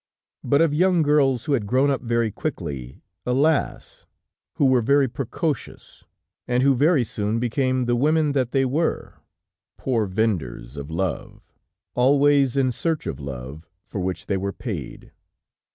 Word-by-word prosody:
But 140 +2 +3
of 165 -3 +3
young 180 +1 +3
girls, 140 -4 +2
who 150 - 0
had 115 -7 0
grown 130 +5 +3
up 135 - -1
very 115 -2 0
quickly, 70 - -5 0.2
alas! 140 +5 0 0.5
who 145 - +1
were 130 -2 +4
very 140 +3 +3
precocious, 135 +3 -5 0.4
and 125 +1 +1
who 140 0 +5
very 145 +1 +3
soon 105 0 -2
became 130 +2 0
the 120 0 +1
women 150 +4 +2
that 130 -4 0
they 135 -1 +2
were, 150 +6 -2 0.6
poor 115 -5 0
vendors 90 - -2
of 70 +1 -7
love, 85 +2 -4 0.5
always 140 +1 +3
in 130 -2 +2
search 160 +5 -2
of - - -4
love 70 +3 -8
for 100 - -6
which 90 0 -3
they 100 - -1
were 100 +1 -3
paid. - - -7
125 Hz, 150 wpm, -23 LUFS, 100-140 Hz, 0.6 s, who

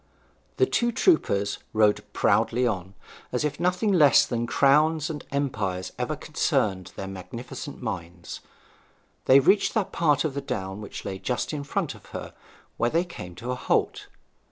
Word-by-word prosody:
The - - +5
two 240 -10 +1
troopers 160 - +2
rode 105 -1 +3
proudly 125 +2 +2
on, 95 -4 -2 0.4
as 125 +4 0
if 145 0 -3
nothing 180 +4 +1
less 155 -7 +6
than 120 -1 -2
crowns 155 +4 +3
and 150 - -6
empires 110 -10 -2
ever - - -1
concerned 95 -4 -1
their 95 - -5
magnificent 120 - -8
minds. 85 -5 -6 0.9
They 135 +1 +7
reached 195 - +3
that 200 -3 0
part 150 -3 +2
of 150 - -1
the 140 - -3
down 95 -7 -4
which 105 - -8
lay 95 -1 -4
just 120 +8 -2
in 145 -2 -3
front 140 - -2
of - - -16
her, - - -7 0.4
where 120 - +2
they 170 +5 +1
came 90 - -9
to 120 +6 -5
a - - -1
halt. - - 0
125 Hz, 160 wpm, -26 LUFS, 100-155 Hz, 0.9 s, They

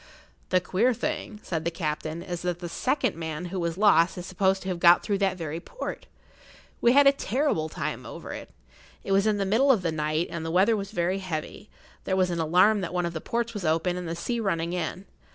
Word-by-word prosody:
"The 185 - +4
queer 220 +7 +1
thing," 245 -4 -4
said 160 -3 -3
the 170 - 0
captain, 160 0 -4
"is 175 -2 -5
that 180 -1 -2
the 175 0 -6
second 260 - 0
man 160 +1 -5
who 190 - -1
was 170 0 -2
lost 190 -4 +4
is 180 - -6
supposed 190 +1 +1
to - - -7
have 180 -2 -2
got 175 0 +6
through 200 -2 -1
that 190 -2 +1
very 160 -1 -4
port. - - -7 0.7
We 240 - +5
had 285 +1 +6
a 275 - +8
terrible 255 - -1
time - - -4
over - - -8
it. - - -8 0.5
It - - -4
was 195 +2 +3
in 210 -1 +2
the 200 - 0
middle 240 +8 +4
of 215 -8 +2
the 165 - 0
night, 155 +2 -1
and 170 -2 -4
the 160 - -3
weather 190 +7 +4
was 200 -2 -4
very 185 -1 -1
heavy; 185 +3 -5 0.4
there 190 - 0
was 185 -1 +2
an 170 - -2
alarm 185 +6 +4
that 180 0 -4
one 180 -1 +1
of 170 - -3
the 160 - -4
ports 235 0 -2
was 205 -4 -5
open 165 +2 +1
and 180 -1 -5
the 165 - -3
sea 235 +7 -2
running 170 -5 -1
in. 180 +2 -3
180 Hz, 235 wpm, -26 LUFS, 170-205 Hz, 0.7 s, a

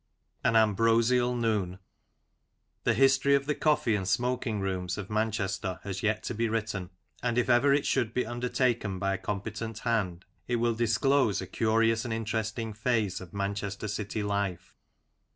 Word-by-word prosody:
AN 115 - +2
AMBROSIAL 115 +3 +3
NOON. 105 -6 0 1.1
THE - - +3
history 135 +1 +4
of 140 0 0
the 150 - +1
Coffee 150 -7 +2
and 95 -3 -1
Smoking 120 +1 0
rooms 95 -2 -2
of 100 0 -6
Manchester 105 -4 -1
has 95 -2 -4
yet 110 0 0
to - - -3
be 115 +1 0
written, 105 -5 -2 0.3
and 120 -1 -1
if 125 0 +2
ever 120 +4 +5
it 140 +1 +2
should 120 -5 +1
be 125 - 0
undertaken 120 -3 -1
by 95 +1 0
a 95 - -3
competent 105 +3 -4
hand, 100 -7 -1 0.2
it 120 - 0
will 120 0 +1
disclose 120 -1 +2
a 95 - -4
curious 115 +2 +2
and 115 -3 -2
interesting 110 0 -3
phase 110 -4 0
of 90 - -10
Manchester 100 +1 -3
city 105 +1 -3
life. 100 -3 -2
110 Hz, 160 wpm, -29 LUFS, 100-120 Hz, 1.1 s, ever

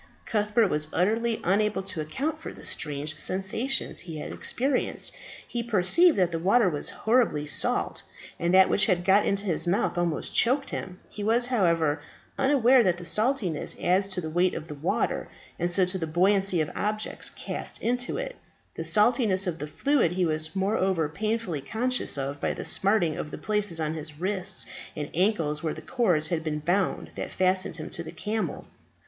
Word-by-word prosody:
Cuthbert 210 0 +2
was 150 -1 +2
utterly 225 +5 +1
unable 205 +1 +1
to 190 -4 -3
account 285 - -3
for - - -7
the - - -13
strange 150 +2 -3
sensations 195 +8 0
he 165 -3 -6
had 150 - -6
experienced; 260 +1 -1 0.3
he 240 - -3
perceived 235 - +4
that 180 -2 +2
the 165 - -2
water 200 +5 +3
was 150 -5 -1
horribly 220 -10 +1
salt, 150 - 0 0.4
and 170 +1 0
that 190 0 +6
which 200 - +3
had 175 -3 +1
got 195 +2 +4
into 200 +1 +1
his 175 -2 0
mouth 175 -1 0
almost 170 -3 -1
choked 265 +4 +3
him. 185 -1 -6
He 210 - -7
was, 230 +3 +3
however, 170 - +1 0.3
unaware 265 -2 +4
that 180 -6 +1
saltness 210 - +1
adds 190 +2 +2
to 185 -2 -3
the 160 - -5
weight 175 +2 +2
of 150 -2 -7
water, 200 +7 -1 0.3
and 175 +1 0
so 185 +1 +4
to 185 +1 -3
the 165 - -3
buoyancy 190 +2 +3
of 155 - -3
objects 215 +1 -1
cast - - -5
into 245 - -1
it. - - -5 0.4
The - - -5
saltness 210 -3 +3
of 170 -3 -3
the 150 - -4
fluid 240 - +1
he 185 0 +1
was 155 +1 -1
moreover 190 -5 0
painfully 215 -4 -2
conscious 245 - -1
of 140 +1 -4
by - - -1
the - - -6
smarting 190 -6 +1
of 150 - -5
the - - -7
places 210 -6 0
on 155 -1 -1
his 155 -1 -6
wrists 190 +1 0 0.3
and 150 -1 -5
ankles 165 -5 0
where 160 -2 -2
the - - -9
cords 180 -12 +1
had 165 -2 -1
been 155 -1 -2
bound 180 +5 -1
that - - -5
fastened 185 -2 0
him 155 - -7
to - - -1
the 170 - -8
camel. 215 +1 -3
190 Hz, 180 wpm, -26 LUFS, 165-220 Hz, 0.4 s, that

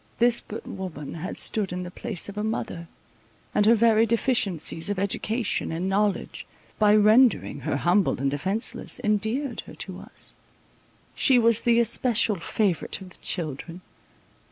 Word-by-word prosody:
This 240 0 +3
good 220 - -8
woman 180 -7 -7
had 170 +2 -6
stood 205 -4 +1
in 180 0 -4
the 180 - -8
place 220 -2 -3
of 200 - -8
a 210 - -3
mother, 175 -6 -4 0.7
and 210 0 +3
her 230 - +7
very 225 0 +4
deficiencies 205 - +1
of 205 - -1
education 200 +3 -1
and 170 +3 -2
knowledge, 200 +1 -1 0.3
by 210 -1 +5
rendering 215 - +4
her 150 +3 -2
humble 180 -2 +2
and 135 0 0
defenceless, 200 - -1
endeared 220 +6 -1
her - - -11
to - - -7
us—she 260 - -3
was 230 -1 +4
the 235 -1 +3
especial 235 -2 +2
favourite 180 +1 -1
of 190 -2 -12
the - - -16
children. 165 +1 -5
205 Hz, 150 wpm, -25 LUFS, 180-230 Hz, 0.7 s, her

